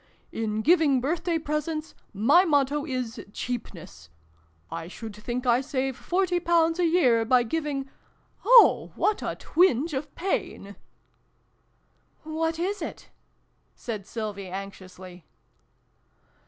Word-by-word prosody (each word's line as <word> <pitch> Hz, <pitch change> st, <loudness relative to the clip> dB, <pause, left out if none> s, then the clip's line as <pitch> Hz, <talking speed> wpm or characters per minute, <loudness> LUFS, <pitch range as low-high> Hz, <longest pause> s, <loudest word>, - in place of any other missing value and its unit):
"In 220 Hz, -1 st, -2 dB
giving 310 Hz, -4 st, +4 dB
birthday 330 Hz, +5 st, -1 dB
presents, 310 Hz, 0 st, -3 dB, 0.2 s
my 250 Hz, -, +4 dB
motto 290 Hz, -2 st, +1 dB
is 250 Hz, -4 st, -4 dB
cheapness! 165 Hz, -, -7 dB, 0.6 s
I 165 Hz, -, -5 dB
should 215 Hz, +3 st, -9 dB
think 240 Hz, +4 st, -4 dB
I 245 Hz, +1 st, +3 dB
save 265 Hz, -1 st, -2 dB
forty 360 Hz, +3 st, 0 dB
pounds 335 Hz, -1 st, +2 dB
a 355 Hz, -, +3 dB
year 255 Hz, -10 st, +3 dB
by 245 Hz, +2 st, +3 dB
giving 280 Hz, +1 st, -3 dB, 0.6 s
oh, 475 Hz, +2 st, +6 dB
what 420 Hz, 0 st, +1 dB
a -, -, -3 dB
twinge 320 Hz, -3 st, +2 dB
of 280 Hz, +1 st, -5 dB
pain! 205 Hz, -, -3 dB, 0.5 s
" -, -, -43 dB
" -, -, -41 dB
What 320 Hz, +1 st, -2 dB
is 380 Hz, +3 st, -2 dB
it? -, -, -7 dB, 0.3 s
" -, -, -44 dB, 0.3 s
said 215 Hz, -5 st, -6 dB
Sylvie 210 Hz, -4 st, -5 dB
anxiously. 185 Hz, -2 st, -9 dB
270 Hz, 125 wpm, -26 LUFS, 220-325 Hz, 0.6 s, oh